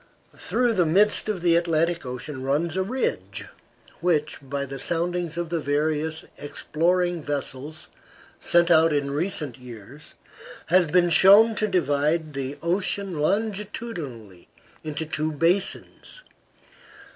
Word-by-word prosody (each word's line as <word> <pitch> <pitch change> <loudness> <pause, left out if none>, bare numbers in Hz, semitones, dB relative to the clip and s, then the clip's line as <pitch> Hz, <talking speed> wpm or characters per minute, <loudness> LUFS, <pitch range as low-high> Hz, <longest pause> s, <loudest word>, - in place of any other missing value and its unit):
Through 245 -2 0
the 180 -5 +2
midst 205 +6 +3
of 190 -5 -3
the 170 -1 +4
Atlantic 170 -2 +1
Ocean 130 +2 -6
runs 150 +6 -1
a 190 - +1
ridge, 250 +7 -3 0.5
which, 155 -4 0
by 140 0 -4
the 135 0 -7
soundings 170 0 -2
of 170 -1 -3
the 170 -1 -1
various 155 +2 -1
exploring 175 +4 -1
vessels 145 +1 -5 0.5
sent 170 0 +3
out 160 -1 +5
in 140 -1 -1
recent 150 -5 -2
years, 125 +3 -12 0.5
has 175 0 +4
been 175 +2 +3
shown 200 +7 +7
to 215 0 -1
divide 155 -2 0
the 135 +1 -4
ocean 185 0 -1
longitudinally 185 - -3 0.4
into 155 +1 -4
two 155 0 -2
basins. 180 - 0
165 Hz, 120 wpm, -24 LUFS, 145-180 Hz, 0.5 s, shown